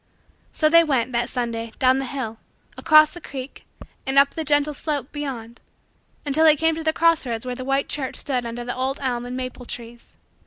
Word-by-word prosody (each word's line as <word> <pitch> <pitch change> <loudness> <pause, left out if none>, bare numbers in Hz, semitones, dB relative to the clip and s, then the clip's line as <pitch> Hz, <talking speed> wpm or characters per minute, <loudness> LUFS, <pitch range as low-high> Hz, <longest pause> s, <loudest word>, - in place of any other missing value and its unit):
So 310 - +2
they 335 +2 +6
went, 260 -6 0
that 240 0 -1
Sunday, 230 -2 -3
down 260 0 +3
the 270 - -3
hill, 240 -4 -5 0.4
across 310 -1 +5
the 350 - -10
creek, 270 -2 -8 0.4
and 270 0 -1
up 280 0 +6
the 320 - -4
gentle 295 0 +2
slope 290 -2 -3
beyond, 250 -6 -6 0.6
until 295 +2 +2
they 310 -1 +7
came 325 +2 +2
to 320 +1 -5
the 315 - +2
cross 330 0 +3
roads 235 -2 -4
where 250 - -3
the 255 +1 -6
white 270 +1 0
church 270 -3 -3
stood 255 -3 -1
under 235 +1 -5
the 245 - -3
old 260 +2 -2
elm 245 -3 -2
and 250 +1 -5
maple 255 -1 -6
trees. 235 0 -9
265 Hz, 205 wpm, -23 LUFS, 245-300 Hz, 0.6 s, they